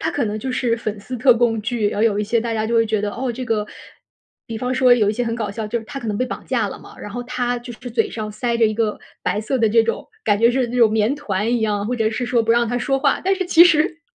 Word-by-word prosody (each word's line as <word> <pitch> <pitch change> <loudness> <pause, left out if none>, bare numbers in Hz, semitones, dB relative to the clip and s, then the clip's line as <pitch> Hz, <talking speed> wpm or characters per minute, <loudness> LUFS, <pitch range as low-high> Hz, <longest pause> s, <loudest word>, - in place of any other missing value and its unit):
它 320 - -1
可 285 -7 -1
能 215 0 -3
就 260 - -4
是 240 -2 0
粉 215 -2 -4
丝 250 +5 -6
特 250 +1 +5
供 225 -2 +1
剧， 220 -1 -1
然 205 - -4
后 - - +2
有 210 -3 +2
一 210 - 0
些 230 +2 +1
大 230 0 -3
家 220 0 -1
就 235 - -1
会 225 0 +3
觉 215 -1 0
得， 205 0 -2
哦， 250 0 -3
这 255 +2 -5
个 220 -3 -1 0.8
比 225 -2 -5
方 250 +2 -2
说 255 -1 +5
有 210 -4 +2
一 - - -2
些 245 +2 -2
很 230 0 -2
搞 225 -3 -3
笑， 215 +1 -5
就 235 +3 -2
是 225 - -10
她 275 - -7
可 235 - -7
能 205 - -1
被 255 - 0
绑 - - -7
架 230 -6 0
了 - - -8
嘛， - - -14
然 205 - -8
后 245 +2 -5
她 245 0 -2
就 240 0 -9
是 245 +2 -9
嘴 225 -1 0
上 215 -1 -5
塞 235 +2 -2
着 230 - +3
一 215 - -1
个 220 -2 -1 0.2
白 210 - 0
色 255 +4 -2
的 225 -1 +3
这 225 +1 +4
种 230 - -3 0.2
感 205 -2 +2
觉 230 +1 +5
是 255 0 0
那 245 - -4
种 230 -3 +5
棉 220 +4 +1
团 220 -5 -2
一 - - -2
样， 210 -1 -1
或 250 - -1
者 220 -1 +1
是 240 +2 -3
说 235 -2 +2
不 225 - -1
让 235 -1 +2
她 245 - -1
说 270 +2 0
话， 275 0 +1
但 385 +1 +3
是 375 - -2
其 340 -1 +7
实 325 -1 +2
230 Hz, 345 characters per minute, -20 LUFS, 215-250 Hz, 0.8 s, 其